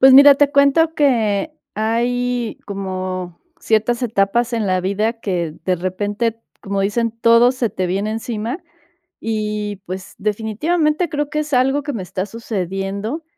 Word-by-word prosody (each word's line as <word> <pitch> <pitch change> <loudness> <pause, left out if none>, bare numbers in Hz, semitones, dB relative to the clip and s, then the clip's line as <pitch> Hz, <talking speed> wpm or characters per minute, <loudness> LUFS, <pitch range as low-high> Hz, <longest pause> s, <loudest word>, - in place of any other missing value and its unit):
Pues, 265 0 +8
mira, 280 +1 +10
te 285 0 +3
cuento 285 +3 +4
que 240 -4 +2 0.2
hay 240 +2 -1
como 185 -3 -4 0.2
ciertas 225 +3 +1
etapas 235 +1 +1
en 225 -3 0
la 185 -1 +1
vida 205 +5 0
que, 175 -7 -2
de 185 -1 +1
repente, 205 +5 -2 0.2
como 200 0 -2
dicen: 230 +4 +1
"Todo 230 +2 +6
se 250 -4 -1
te 185 - -2
viene 195 +4 -1
encima" 225 +4 -3 0.6
y, 210 -2 -2
pues, 185 +1 -7
definitivamente, 300 - 0
creo 295 0 -2
que 305 - 0
es 300 0 -5
algo 270 +3 +3
que 290 - -4
me 210 - -3
está 185 +2 -3
sucediendo. 200 - -4
220 Hz, 150 wpm, -19 LUFS, 195-250 Hz, 0.6 s, mira